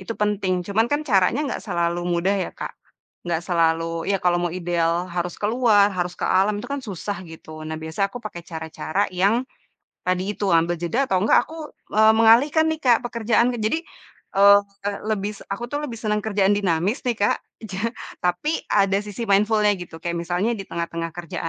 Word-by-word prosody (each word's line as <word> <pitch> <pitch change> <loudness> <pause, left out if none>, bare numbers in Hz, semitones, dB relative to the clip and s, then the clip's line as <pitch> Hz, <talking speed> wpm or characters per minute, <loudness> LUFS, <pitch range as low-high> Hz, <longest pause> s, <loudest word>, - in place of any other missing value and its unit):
itu 210 +4 -6
penting. 195 -4 0
Cuman 220 +5 +1
kan, 295 +3 0
caranya 230 +5 +2
enggak 275 - -3
selalu 170 +1 -1
mudah 175 +3 +1
ya, 195 -2 -1
Kak. - - -5 0.6
Enggak 170 0 -1
selalu 165 -1 0
ya, 200 - +3
kalau 175 0 +3
mau 175 - 0
ideal 170 0 0
harus 175 0 -3
keluar, 210 -2 +3
harus 180 -1 -3
ke - - -3
alam, 195 +3 +2
itu 205 - -6
kan 280 - -2
susah 200 -3 -5
gitu. 155 -1 -11
Nah, 160 - -4
biasa 160 +5 -2
aku 220 - -11
pakai 175 -5 -6
cara-cara 160 +3 -2
yang 205 +7 +2 0.6
tadi 185 +3 0
itu 205 -1 -2
ambil 170 0 +2
jeda 225 +11 0
atau 190 -7 +1
enggak 220 +3 +4
aku 315 -2 -8 0.2
e 215 - +2 0.2
mengalihkan 245 +8 +5
nih 315 0 -3
Kak, 240 -3 +5
pekerjaanku. 235 +1 +1
Jadi, 220 +10 +1 0.6
eee, 200 +1 +8 0.5
lebis 210 -1 -2
aku 200 +4 -4
tuh 290 - -1
lebih 235 -3 -6
senang 210 -2 0
kerjaan 200 -2 +2
dinamis 190 - 0
nih, 240 -3 0
Kak. 205 - +2 0.3
Ja 190 0 -6 0.5
tapi 180 +12 0 0.2
ada 195 -1 +3
sisi 210 +2 -6
mindful-nya 210 +1 +4
gitu, 170 -2 -9
kayak 170 0 -2
misalnya 175 +6 -1
di 195 - -5
tengah-tengah 170 0 -3
kerja 170 -2 -6
195 Hz, 180 wpm, -23 LUFS, 175-220 Hz, 0.6 s, eee